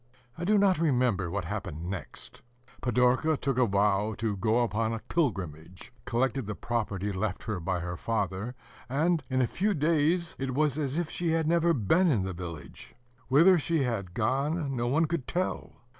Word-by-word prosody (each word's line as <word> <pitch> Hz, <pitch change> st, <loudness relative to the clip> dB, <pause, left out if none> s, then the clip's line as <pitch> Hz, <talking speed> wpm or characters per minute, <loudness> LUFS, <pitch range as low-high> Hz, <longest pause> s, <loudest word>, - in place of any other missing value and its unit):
I 170 Hz, -, -4 dB
do 210 Hz, +3 st, +4 dB
not 195 Hz, -4 st, +3 dB
remember 125 Hz, -, +1 dB
what -, -, -3 dB
happened 80 Hz, +4 st, -5 dB
next. 90 Hz, -6 st, -7 dB, 0.4 s
Pidorka 125 Hz, +5 st, +2 dB
took 135 Hz, -2 st, -1 dB
a 125 Hz, -, +4 dB
vow 100 Hz, +1 st, +1 dB
to 110 Hz, -2 st, -1 dB
go 110 Hz, +5 st, +2 dB
upon 115 Hz, 0 st, -1 dB
a -, -, -2 dB
pilgrimage, 90 Hz, -, -3 dB
collected 130 Hz, 0 st, 0 dB
the 105 Hz, -, -3 dB
property 105 Hz, -4 st, -2 dB
left 95 Hz, +1 st, -2 dB
her 105 Hz, -4 st, -3 dB
by 90 Hz, +1 st, -2 dB
her 85 Hz, 0 st, -4 dB
father, 105 Hz, +3 st, -2 dB, 0.3 s
and 160 Hz, +5 st, +1 dB
in 130 Hz, -1 st, +2 dB
a -, -, +4 dB
few 205 Hz, -, 0 dB
days 165 Hz, +3 st, +1 dB
it 135 Hz, -1 st, -2 dB
was 150 Hz, 0 st, +1 dB
as 140 Hz, 0 st, -1 dB
if 170 Hz, -2 st, -2 dB
she 175 Hz, -1 st, -1 dB
had 165 Hz, -1 st, +1 dB
never 170 Hz, +1 st, +3 dB
been 165 Hz, -, +3 dB
in 120 Hz, -, +2 dB
the 95 Hz, 0 st, -3 dB
village. 85 Hz, -3 st, -9 dB, 0.3 s
Whither 170 Hz, +7 st, +6 dB
she 160 Hz, -1 st, 0 dB
had 100 Hz, -8 st, -3 dB
gone, 135 Hz, +5 st, 0 dB
no 120 Hz, -1 st, -1 dB
one 155 Hz, +6 st, +3 dB
could 160 Hz, -4 st, -3 dB
tell. 185 Hz, +1 st, -2 dB
125 Hz, 180 wpm, -29 LUFS, 100-155 Hz, 0.4 s, Whither